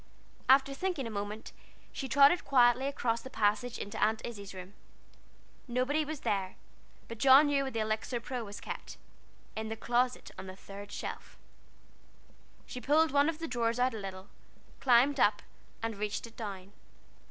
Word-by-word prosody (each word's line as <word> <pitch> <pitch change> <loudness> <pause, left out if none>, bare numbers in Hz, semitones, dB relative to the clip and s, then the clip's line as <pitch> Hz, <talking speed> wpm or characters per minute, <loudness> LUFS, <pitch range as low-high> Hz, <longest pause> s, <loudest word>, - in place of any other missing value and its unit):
After 270 +1 +6
thinking 350 -2 -2
a 230 - -5
moment, 205 +1 -5 0.4
she 270 - -5
trotted 285 +7 +6
quietly 250 -1 +4
across 235 -5 -1
the 260 - -9
passage 225 +1 0
into 205 - -5
Aunt 220 +1 +2
Izzie's 200 -4 -7
room. 185 +1 -9 0.9
Nobody 255 +5 +1
was 305 -1 -6
there, 190 -2 -1 0.5
but 230 -1 -8
John 270 +3 +8
knew 285 -1 +2
where 265 - -4
the 225 - -1
Elixir 220 +3 -2
Pro 245 +1 -4
was 205 -1 -8
kept - - -7 0.6
in 220 0 -4
the 225 - -3
closet 245 +2 0
on 190 - -7
the 185 - -8
third 200 +1 -10
shelf. - - -7 1.3
She 250 - -7
pulled 310 +3 +3
one 285 +2 +4
of 325 - -3
the 330 0 -5
drawers 235 -3 0
out 255 0 +2
a 220 - -5
little, 190 -1 -7 0.5
climbed 260 +2 +4
up, 205 -2 +3 0.4
and 225 -1 -2
reached 210 +2 -3
it 230 0 -14
down. 200 -3 -7
235 Hz, 165 wpm, -31 LUFS, 210-270 Hz, 1.3 s, John